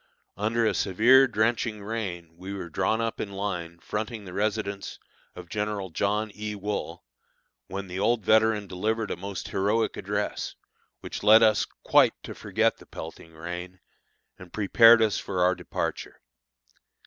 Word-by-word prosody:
Under 110 +4 0
a 105 - +2
severe, 120 +9 +5
drenching 110 -1 0
rain 90 -7 -5
we 95 +3 -7
were 90 -3 -6
drawn 110 +8 +1
up 115 -1 -2
in 100 - -5
line 90 -4 -4
fronting 110 +4 -5
the 90 - -9
residence 100 -1 -2 0.4
of 90 -1 -9
General 105 -1 -3
John 105 +4 0
E. 105 0 -5
Wool, 105 +1 -4 0.6
when 95 +1 -5
the 90 0 -6
old 110 0 +1
veteran 110 -1 +3
delivered 105 +4 -2
a - - -1
most 100 +2 -6
heroic 105 +4 0
address, - - -3 0.5
which - - -6
led 110 +2 +7
us 110 -1 +4 0.2
quite - - +5
to - - -7
forget - - 0
the - - -17
pelting 80 0 -9
rain, 90 +3 -7 0.6
and 90 -1 -12
prepared 115 +2 +6
us 110 -2 +1
for 90 -2 -1
our 90 +1 +4
departure. 90 -1 -4
100 Hz, 150 wpm, -27 LUFS, 90-110 Hz, 0.6 s, led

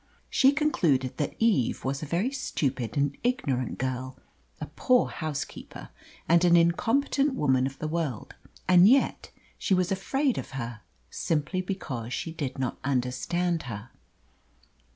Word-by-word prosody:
She 270 +1 +5
concluded 170 - +1
that 145 - -2
Eve 215 - +1
was 135 +1 -1
a 155 - -5
very 180 - 0
stupid 135 - -2
and 140 0 +1
ignorant 145 - -1
girl, 130 0 -3 0.4
a 155 - -4
poor 250 - +2
housekeeper, 155 -2 -6 0.4
and 170 +1 +5
an 175 -1 +6
incompetent 260 - +2
woman 130 - +2
of 135 0 -8
the 155 - -3
world; 155 -7 -3 0.3
and 185 +2 +7
yet 270 +2 +2 0.3
she 190 - +2
was 185 +1 0
afraid 265 +8 0
of - - -8
her, 115 -3 -5 0.3
simply 165 +3 -1
because 135 - -5
she 165 - -4
did 145 -5 -4
not 130 -2 -2
understand 140 +7 0
her. 105 +1 -7
155 Hz, 140 wpm, -27 LUFS, 130-190 Hz, 0.4 s, and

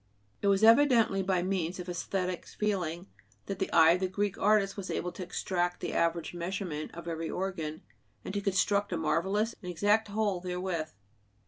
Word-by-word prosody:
It - - +1
was 200 +1 +3
evidently 230 -4 +5
by 185 -2 +1
means 185 -2 -1
of 180 - -5
æsthetic 180 0 -3
feeling 180 -5 -1 0.4
that 195 -1 -5
the 190 - -2
eye 160 -1 +7
of 175 - +2
the 185 - 0
Greek 200 +1 -1
artist 205 -1 +2
was 195 -2 -6
able 180 - -2
to - - -9
extract 175 0 -2
the - - -4
average 170 0 0
measurement 175 -3 -4
of 170 0 -8
every 165 -1 -3
organ, 165 -5 -4 0.4
and 190 - -5
to 205 - -1
construct 200 +1 +1
a 175 - 0
marvelous 195 +8 0
and 180 - -6
exact 205 +5 +2
whole 205 -2 0
therewith. 180 -3 -3
185 Hz, 180 wpm, -30 LUFS, 175-200 Hz, 0.4 s, eye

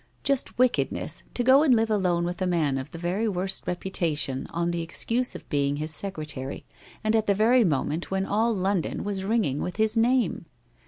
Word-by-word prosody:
Just 275 -2 0
wickedness, 255 0 0
to 245 - 0
go 260 +3 +6
and 280 -5 +5
live 225 0 +1
alone 180 -4 +1
with 175 +1 -4
a 185 - +1
man 155 -6 +1
of 130 - -7
the - - -9
very 185 +6 -1
worst 190 0 0
reputation 165 -7 -1
on 170 +1 -1
the 170 0 -2
excuse 230 +9 -1
of - - -10
being 140 -1 0
his 155 +2 -2
secretary, 155 -8 -4 0.4
and 215 +1 +2
at 220 -1 +1
the 200 - +3
very 235 +4 +4
moment 155 -1 -1
when 190 0 -1
all 220 +4 +1
London 195 -3 -1
was 200 -2 -3
ringing 195 - 0
with 180 - -4
his 220 +1 +1
name 230 -7 +1
190 Hz, 195 wpm, -26 LUFS, 165-225 Hz, 0.4 s, go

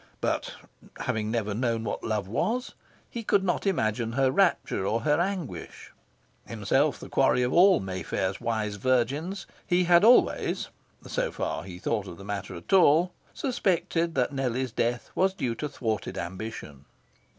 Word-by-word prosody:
But, - - -2 0.5
having 110 -1 -1
never 110 -3 -1
known 115 0 -1
what 105 - -4
love 105 -3 -1
was, 230 - -1 0.3
he 235 - -6
could 205 -3 +2
not 185 +1 0
imagine 115 - 0
her 135 0 +2
rapture 180 - +2
or 110 +4 0
her 150 +5 +2
anguish. 175 - -5 0.6
Himself 115 +7 +1
the - - -9
quarry 135 -2 +3
of 125 - 0
all 185 +2 +6
Mayfair's 95 0 -3
wise 110 -3 -2
virgins, 135 - 0 0.2
he 180 +1 +3
had 175 0 +5
always 240 +3 +4 0.4
so - - -1
far - - -3
as 90 - -11
he 90 -2 -8
thought 105 +2 -2
of 85 -2 -9
the 100 - -11
matter 100 -2 -5
at 85 - -6
all 175 -1 +5 0.2
suspected 175 - 0
that 130 +2 +1
Nellie's 130 -2 -1
death 120 +1 -1
was 190 0 +1
due 120 -10 -1
to 150 +5 -4
thwarted 110 -7 -3
ambition. 90 -6 -6
125 Hz, 160 wpm, -27 LUFS, 105-170 Hz, 0.6 s, all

